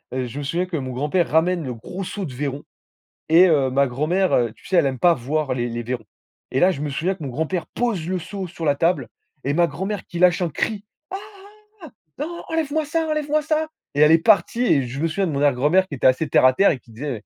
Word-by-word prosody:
heu, 130 -1 -1
je 130 +4 -7
me - - -4
souviens 170 +6 -1
que 180 -2 -6
mon 130 -2 -4
grand-père 150 +7 0
ramène 165 +2 +2
le 125 -3 -5
gros 180 - -7
seau 195 +1 -5
de 140 - -7
vairons, 140 +2 -4 0.7
et 170 +4 +7
heu, 145 -6 +3
ma 140 +2 +2
grand-mère, 150 +1 +1
tu - - -22
sais? 185 - +1
Elle 155 - +4
aime 130 -1 -3
pas 175 +3 +5
voir 140 +1 -2
les 120 -1 -2
les 120 0 -4
vairons, 120 -1 -4 0.4
et 130 - 0
là 185 +5 +5
je 145 - -5
me 150 - -2
souviens 170 +7 -1
que 180 - -10
mon 140 - -4
grand-père 160 +6 -2
pose 220 -9 -2
le 185 0 -1
seau 185 +2 -6
sur 165 -1 -7
la 145 - +4
table, 145 - 0 0.3
et 140 - 0
ma 170 +1 +3
grand-mère 195 +2 -4
qui 175 - -7
lâche 180 +1 +4
un 175 - 0
cri 205 +7 -2 0.3
«Ah! 385 - -3
Ah! - - -12 1.1
Non, 345 +1 -7
enlève-moi 315 -1 -1
ça, 320 +2 -1
enlève-moi 305 0 0
ça!» 310 +1 0 0.3
et 145 - 0
elle 150 +1 +7
est 165 - +7
partie 220 +6 +3
et 140 - +2
je 130 +4 -6
me 165 - +1
souviens 190 +4 -1
de 165 - -2
mon 140 - -2
arrière 145 -2 +3
grand-mère, 155 +9 +3
qui 145 - -6
était 125 - 0
assez 130 +5 +1
terre - - +4
à 130 - +7
terre 195 +8 +4
et 135 - -4
qui 120 - -22
disait 140 +7 -5
160 Hz, 260 wpm, -22 LUFS, 135-190 Hz, 1.1 s, et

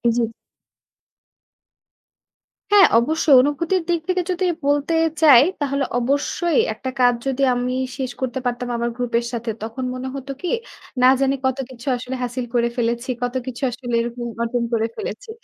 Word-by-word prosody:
জি। 230 -1 0 2.4
হ্যাঁ, 405 -2 +8
অবশ্যই। 300 +2 +3
অনুভূতির 330 +6 0
দিক 340 -1 +2
থেকে 365 0 +2
যদি 365 +1 -1 0.2
বলতে 290 +3 +1 0.3
চাই, 275 -6 +8 0.2
তাহলে 280 -1 0 0.2
অবশ্যই 285 +5 0
একটা 260 - -5
কাজ 245 -1 +5
যদি 270 +1 0
আমি 250 +1 -1 0.2
শেষ 260 -2 -3
করতে 260 0 -2
পারতাম 245 0 -2
আমার 235 0 -1
গ্রুপ 245 -2 -3
এর 235 - -5
সাথে, 235 -1 -2
তখন 230 +4 -5
মনে 255 +1 -5
হতো 275 0 -6
কী, 360 - -3 0.6
না - - +8
জানি 275 0 +2
কত 260 +1 +1
কিছু 255 +1 -12
আসলে 250 +2 -5
হাসিল 245 0 -3
করে 235 0 +3
ফেলেছি, 235 +1 -1
কত 245 +1 -2
কিছু 255 +1 -6
আসলে 245 0 -6
এরকম 240 +1 -5 0.2
অর্জন 235 +1 0
করে 225 0 +1
ফেলেছি। 450 +2 -6
255 Hz, 160 wpm, -21 LUFS, 240-285 Hz, 2.4 s, হ্যাঁ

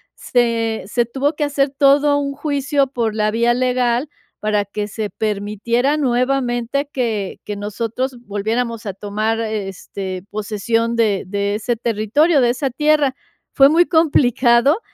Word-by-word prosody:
se 230 -2 0
se 240 +2 +1
tuvo 275 +6 -1
que 300 - -1
hacer 280 -1 0
todo 285 +1 +4
un 280 -1 -2
juicio 285 -1 0
por 230 -4 -2
la 215 -1 +1
vía 235 +2 +2
legal, 250 +2 0 0.3
para 210 -1 0
que 205 +1 -4
se 210 0 -4
permitiera 220 +6 -1
nuevamente 255 0 0
que 220 -7 -2
que 210 - -4
nosotros 230 +5 -3
volviéramos 225 +3 -2
a 200 - -3
tomar, 215 +3 -2
este, 195 -3 -5
posesión 225 +2 -1
de 210 -4 +1
de 200 +1 -1
ese 235 +3 -1
territorio, 235 +8 +2
de 240 - +3
esa 265 +2 -2
tierra. 295 0 +2 0.4
Fue 275 - +7
muy 340 +3 +4
complicado, 275 - +3
235 Hz, 140 wpm, -19 LUFS, 215-275 Hz, 0.4 s, Fue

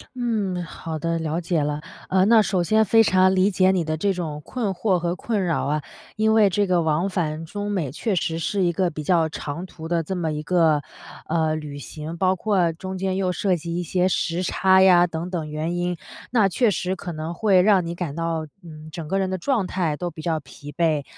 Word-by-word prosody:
嗯， 210 -7 -1
好 165 -1 -6
的， 165 +2 -1
了 160 +1 -2
解 165 -2 0
了。 150 +1 -2 0.3
呃， 190 0 +3
那 225 0 +6
首 185 -3 0
先 220 +4 +3
非 225 +3 +5
常 185 -1 +4
理 190 +2 +3
解 185 0 +4
你 180 -3 +1
的 155 0 -2
这 195 +4 +1
种 155 -4 -4
困 235 -6 -3
惑 185 +1 +1
和 175 +1 -1
困 210 -3 -1
扰 165 -5 0
啊， 150 +1 0 0.3
因 220 0 +2
为 210 -3 +5
这 205 +2 +1
个 180 -2 +2
往 160 +4 +1
返 165 -3 -2
中 205 +4 -4
美 165 -10 -1
确 200 - -2
实 165 -1 -1
是 195 +3 0
一 175 - +2
个 180 +1 0
比 155 -1 -6
较 165 -1 +3
长 155 +4 -5
途 160 -3 -9
的 170 -1 +1
这 190 +5 -4
么 165 -3 -1
一 150 0 -3
个， 160 -3 +3 0.5
呃， 160 -1 +1
旅 150 -2 -6
行， 155 +5 -7
包 185 +1 +2
括 185 -3 +1
中 185 +3 -6
间 190 0 -1
又 185 -1 0
涉 185 +1 +1
及 170 +1 -5
一 175 - -1
些 180 +2 +1
时 175 -1 0
差 190 +1 +4
呀 180 -2 +6
等 170 +1 -4
等 165 -4 -4
原 155 +3 -3
因， 175 0 -1 0.3
那 220 -5 +4
确 225 +4 +2
实 185 0 -2
可 180 -1 -6
能 160 +1 -5
会 190 0 +4
让 190 -3 +4
你 170 - -4
感 170 -4 -4
到， 165 -2 -2 0.2
嗯， 155 -1 -11
整 160 -1 -6
个 195 +3 0
人 190 -1 0
的 185 - -2
状 225 -1 0
态 170 -6 -1
都 175 -1 -3
比 155 -1 -10
较 160 -1 -1
疲 145 +1 -11
惫， 155 -2 +1
175 Hz, 245 characters per minute, -23 LUFS, 160-190 Hz, 0.5 s, 那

